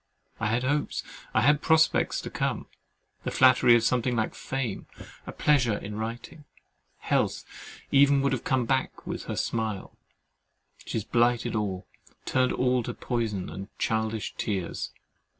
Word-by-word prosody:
I 110 - 0
had 115 +3 0
hopes, 145 +3 -1 0.3
I - - +2
had 145 +1 +4
prospects 160 0 +3
to - - -7
come, - - -2 0.6
the - - -2
flattery 130 -2 +6
of 115 - +3
something 125 +1 +1
like 110 -1 0
fame, 135 -6 -4 0.4
a - - -4
pleasure 125 -8 +2
in 105 +1 -7
writing, 115 +7 -6 0.5
health - - 0 0.5
even 140 0 +5
would 140 - +2
have 125 - -2
come 130 -3 +1
back 130 +2 -1
with - - -5
her - - -4
smile—she 110 -4 -6
has 110 - -1
blighted 120 0 +2
all, 100 -4 -2 0.4
turned 130 -1 +2
all 125 0 +2
to - - -5
poison 110 -6 -2
and 95 +1 -7
childish 110 -1 -1
tears. 95 -5 -2
120 Hz, 145 wpm, -27 LUFS, 110-130 Hz, 0.6 s, flattery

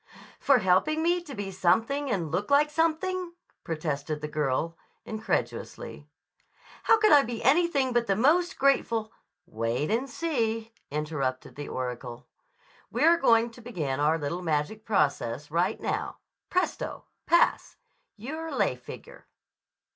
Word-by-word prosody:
"For 275 - +5
helping 215 - +2
me 350 +1 +2
to 295 -6 -9
be 200 -2 -4
something 225 +10 +1
and 175 - -1
look 185 +5 -1
like 295 +1 +4
something?" 340 +3 0 0.3
protested 155 -2 -3
the 150 - -4
girl 150 +2 -1 0.3
incredulously. 220 0 -4 0.8
"How 450 - +6
could 430 0 +4
I 290 - +8
be 235 -3 -5
anything 280 -2 +3
but 240 -1 +1
the 195 - +2
most 340 - +3
grateful—" 230 -5 +2 0.3
"Wait 115 - -2
and 250 +5 0
see," 230 -7 -2 0.2
interrupted 145 -3 -3
the 145 0 -7
oracle. 125 -1 -5 0.6
"We're 335 +1 +4
going 230 -5 +3
to 240 - -14
begin 160 - -3
our 150 +2 +3
little 165 +4 -3
magic 165 +6 -2
process 145 - 0
right 170 +3 +1
now. - - -3 0.3
Presto—pass! 355 -1 0 0.4
You're 310 +9 -6
a - - -5
lay - - +1
figure." - - -12
220 Hz, 130 wpm, -27 LUFS, -, 0.8 s, I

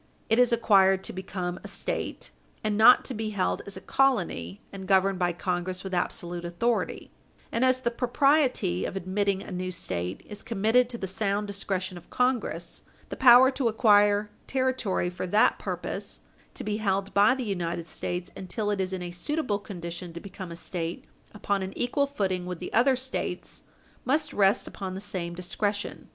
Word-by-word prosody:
It 225 - +5
is 245 -1 +5
acquired 195 -5 +4
to - - -6
become 185 -1 -4
a - - -7
State, - - -4 0.3
and 215 -1 0
not 225 +4 +7
to - - -4
be 220 -1 -3
held 200 -3 -1
as 200 - -6
a - - -8
colony 180 - +1
and 190 -1 -7
governed 195 -1 +3
by 175 -1 +2
Congress 180 +1 -3
with 190 -1 -6
absolute 175 -1 -2
authority, 200 +8 -1 0.4
and, 230 - +1
as 255 0 +3
the 235 - 0
propriety 255 - +2
of - - -4
admitting 195 +1 0
a - - -9
new 185 0 -3
State 90 - -4
is 210 -1 -7
committed 230 +2 +2
to 240 - -4
the 195 - -4
sound 200 +1 -1
discretion 190 -2 -3
of 175 - -22
Congress, 250 -1 -1 0.3
the - - -4
power 260 +1 +8
to 260 -2 0
acquire 210 -2 +4 0.2
territory 260 -9 0
for 180 +1 -4
that 210 +4 +3
purpose, - - -5 0.3
to - - -5
be 210 0 -1
held 195 -2 -1
by 210 +6 +5
the 260 -2 -4
United 175 -4 -3
States 180 0 -4
until 205 +3 -3
it 200 -2 0
is 185 0 -2
in 185 -1 -3
a 175 - -5
suitable 210 - -2
condition 175 -3 -7
to 170 - -6
become 185 -1 -8
a - - -6
State 170 0 -5 0.3
upon 200 -2 -1
an 190 0 -5
equal 280 +4 +1
footing 190 -9 -2
with 180 -1 -4
the 180 - -7
other 260 +3 +5
States, 260 +1 -5 0.4
must 300 +3 0
rest 195 0 +3
upon 190 -2 -6
the - - -4
same 180 -4 -4
discretion. 200 +3 -3
200 Hz, 180 wpm, -27 LUFS, 180-230 Hz, 0.4 s, power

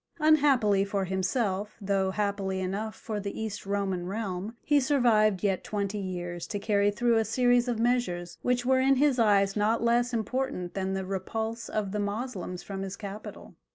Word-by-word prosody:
Unhappily 280 -11 +4
for 195 -1 -1
himself, 195 +2 -1
though 195 -2 0
happily 195 -1 -1
enough 200 +4 -3
for 215 -2 -5
the 200 0 -5
East 220 -3 -5
Roman 195 -3 -1
realm, 200 +1 -4
he 295 -1 +4
survived 230 -8 +3
yet 195 -3 +1
twenty 205 0 -2
years 175 -2 -5
to 205 - -3
carry 205 -1 +2
through 235 +2 +2
a 225 - +3
series 245 +2 +2
of 240 -2 0
measures 225 -8 -1
which 245 -1 0
were 260 0 +4
in 270 +1 +4
his 270 -1 +3
eyes 200 -3 +3
not 220 +2 +1
less 240 +1 +2
important 235 -5 -2
than 190 0 -2
the 190 0 -2
repulse 220 +4 -3
of 205 -3 -2
the 210 - -2
Moslems 205 -3 -4
from 195 -1 -5
his 195 0 -5
capital. 205 0 -8
210 Hz, 175 wpm, -28 LUFS, 195-235 Hz, -, Unhappily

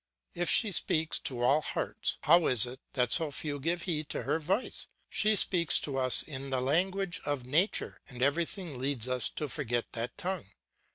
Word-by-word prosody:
If 175 0 0
she 220 -3 +4
speaks 160 -2 +1
to 120 -2 -2
all 140 +5 +4
hearts, - - -3
how 170 +1 +5
is 125 -2 +4
it 125 +1 -8
that 125 -3 +1
so 160 -3 +3
few 145 0 -2
give 165 +4 -2
heed 155 -4 -3
to - - -3
her 160 - 0
voice? 190 +10 -1 0.2
She 215 0 +2
speaks 175 -5 +5
to 140 - -3
us 130 -1 +2
in 135 -2 -6
the 130 -1 0
language 180 +7 0
of 145 -4 -3
nature, 160 - 0
and 125 -2 -4
everything 165 0 -1
leads 130 -3 -2
us 125 -3 0
to 150 - -4
forget 120 -5 -1
that 120 +2 -3
tongue. 185 - -4
150 Hz, 185 wpm, -30 LUFS, 130-170 Hz, 0.2 s, how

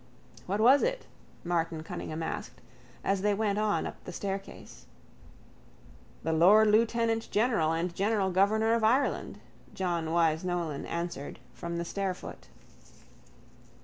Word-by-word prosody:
—What 200 +3 -1
was 255 +6 +6
it? - - -1 0.4
Martin 165 -2 -1
Cunningham 160 0 -5
asked, - - -5 0.4
as 195 -1 0
they 205 0 +2
went 205 -1 0
on 215 -1 +1
up - - -8
the - - -7
staircase. 195 +2 -6 1.4
—The 160 - 0
lord 205 +7 +6
lieutenantgeneral 225 -5 +2
and 175 +1 -2
general 195 0 +1
governor 215 +4 +3
of 230 -1 +1
Ireland, 255 +6 +1 0.4
John 175 -3 -1
Wyse 160 0 +2
Nolan 170 -5 -3
answered 170 -4 -4 0.2
from 170 0 -5
the 170 - -3
stairfoot. 190 0 -5
195 Hz, 120 wpm, -29 LUFS, 170-220 Hz, 1.4 s, was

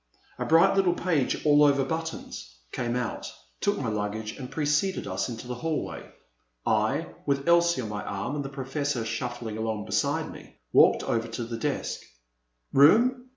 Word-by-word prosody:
A - - -1
bright 170 +5 +5
little 185 -3 +3
page, 160 -9 0
all 150 0 +6
over 140 -2 +4
buttons, 160 - -5 0.2
came 120 -1 -2
out, 125 - -3 0.3
took - - +1
my - - -3
luggage, 105 0 -3
and 130 -3 -7
preceded 150 +5 0
us 95 +5 -2
into 115 0 -7
the 125 - -3
hallway. 155 +6 -4 0.6
I, - - +1 0.2
with 140 +1 0
Elsie 170 -3 +4
on 110 - -5
my 105 0 -4
arm 100 +6 -4
and 145 - -2
the 135 - -5
Professor 135 -2 -2
shuffling 115 -1 -4
along 110 -1 -2
beside - - 0
me, - - -13 0.2
walked - - +6
over 115 0 -1
to 115 +1 -4
the 115 0 -5
desk. - - -2 0.7
"Room? 240 - +5
135 Hz, 165 wpm, -27 LUFS, 115-160 Hz, 0.7 s, all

